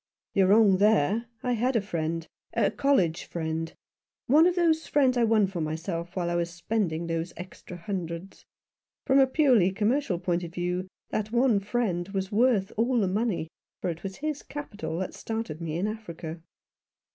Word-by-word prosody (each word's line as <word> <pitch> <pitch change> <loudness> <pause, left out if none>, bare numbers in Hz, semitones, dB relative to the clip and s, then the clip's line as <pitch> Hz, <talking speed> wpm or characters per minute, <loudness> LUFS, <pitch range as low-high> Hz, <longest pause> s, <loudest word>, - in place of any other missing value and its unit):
" - - -67
You're 195 -1 +4
wrong 205 -1 +6
there. 210 +2 +3 0.2
I 250 - 0
had 245 +2 +1
a - - +5
friend 165 -4 -3 0.2
— - - -50
a 205 -4 +3
college 215 - +1
friend; 160 -1 -3 0.5
one 305 +6 +6
of 360 - +1
the 340 -2 +4
friends 290 -5 +1
I 240 - +3
won 220 -2 +4
for 185 -3 -4
myself 165 +2 -4
while 180 -2 -1
I - - 0
was 170 0 0
spending 170 -1 -2
those 165 +1 -3
extra 180 0 -9
hundreds. 175 0 -5 0.6
From 270 +1 +4
a 265 - +6
purely 255 - +4
commercial 215 +1 +1
point 175 0 -1
of 170 0 -8
view 180 +1 -2 0.2
that 215 0 -2
one 240 -3 +3
friend 195 -4 -1
was 195 0 -3
worth 215 -3 +3
all 240 +2 +2
the 200 - +2
money, 195 -4 0 0.3
for 180 - -1
it 165 +1 -8
was 190 0 -5
his 300 0 -3
capital 205 - -6
that 185 +1 -3
started 220 -8 -4
me 160 -1 -3
in 180 - 0
Africa." 170 -7 -6
195 Hz, 180 wpm, -27 LUFS, 170-235 Hz, 0.6 s, wrong